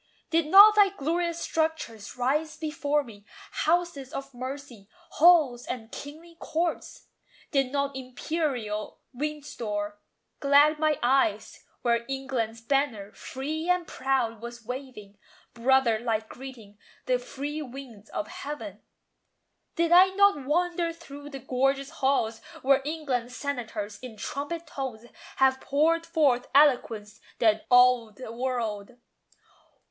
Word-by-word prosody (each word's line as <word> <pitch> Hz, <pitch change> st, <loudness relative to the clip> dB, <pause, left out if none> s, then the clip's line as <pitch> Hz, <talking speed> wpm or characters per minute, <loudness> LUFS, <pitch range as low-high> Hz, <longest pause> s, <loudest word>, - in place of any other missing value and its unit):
Did 330 Hz, -2 st, +2 dB
not 405 Hz, +5 st, +9 dB
thy 410 Hz, -2 st, +6 dB
glorious 340 Hz, 0 st, -2 dB
structures 315 Hz, -11 st, -2 dB
rise 300 Hz, +5 st, 0 dB
before 295 Hz, -2 st, -1 dB
me 210 Hz, -5 st, -13 dB, 0.3 s
Houses 325 Hz, -5 st, 0 dB
of 275 Hz, -3 st, -6 dB
mercy, 255 Hz, -4 st, -8 dB, 0.2 s
halls 300 Hz, -8 st, +5 dB
and 225 Hz, -3 st, -6 dB
kingly 325 Hz, +4 st, -10 dB
courts? 335 Hz, +1 st, -3 dB, 0.5 s
Did 270 Hz, -3 st, +1 dB
not 280 Hz, -1 st, -1 dB
imperial 255 Hz, -5 st, -3 dB, 0.2 s
Windsor 240 Hz, -8 st, -4 dB, 0.4 s
glad 290 Hz, +2 st, +5 dB
my 310 Hz, -2 st, +2 dB
eyes, 240 Hz, -5 st, +1 dB, 0.2 s
Where 235 Hz, -1 st, +2 dB
England's 260 Hz, -4 st, -3 dB
banner, 230 Hz, -5 st, -1 dB
free 310 Hz, +6 st, -5 dB
and 360 Hz, -1 st, +2 dB
proud, 260 Hz, -6 st, -1 dB
was 235 Hz, -1 st, -9 dB
waving; 245 Hz, -5 st, -8 dB, 0.3 s
Brother 240 Hz, -2 st, +3 dB
like 220 Hz, -2 st, -1 dB
greeting 235 Hz, -6 st, -11 dB, 0.3 s
the 250 Hz, -1 st, +1 dB
free 285 Hz, +5 st, -5 dB
winds 250 Hz, -6 st, -10 dB
of 210 Hz, -, -4 dB
heaven? 225 Hz, -9 st, -7 dB, 0.9 s
Did 335 Hz, 0 st, +1 dB
I 360 Hz, +2 st, +8 dB
not 400 Hz, -9 st, +4 dB
wander 345 Hz, +2 st, +1 dB
through 290 Hz, -3 st, -11 dB
the 275 Hz, -, -7 dB
gorgeous 270 Hz, +2 st, 0 dB
halls 265 Hz, -7 st, 0 dB, 0.2 s
Where 275 Hz, +1 st, +4 dB
England's 270 Hz, -5 st, -3 dB
senators, 220 Hz, -7 st, -4 dB
in 245 Hz, -4 st, -9 dB
trumpet 290 Hz, +9 st, -4 dB
tones, 260 Hz, -7 st, -6 dB, 0.3 s
Have 265 Hz, 0 st, +3 dB
poured 330 Hz, +4 st, +1 dB
forth 280 Hz, -7 st, +2 dB
eloquence 230 Hz, -8 st, +3 dB, 0.2 s
that 215 Hz, -1 st, +2 dB
awed 245 Hz, -3 st, +5 dB
the 255 Hz, -3 st, -8 dB
world? 235 Hz, -3 st, -3 dB
270 Hz, 120 wpm, -27 LUFS, 235-305 Hz, 0.9 s, not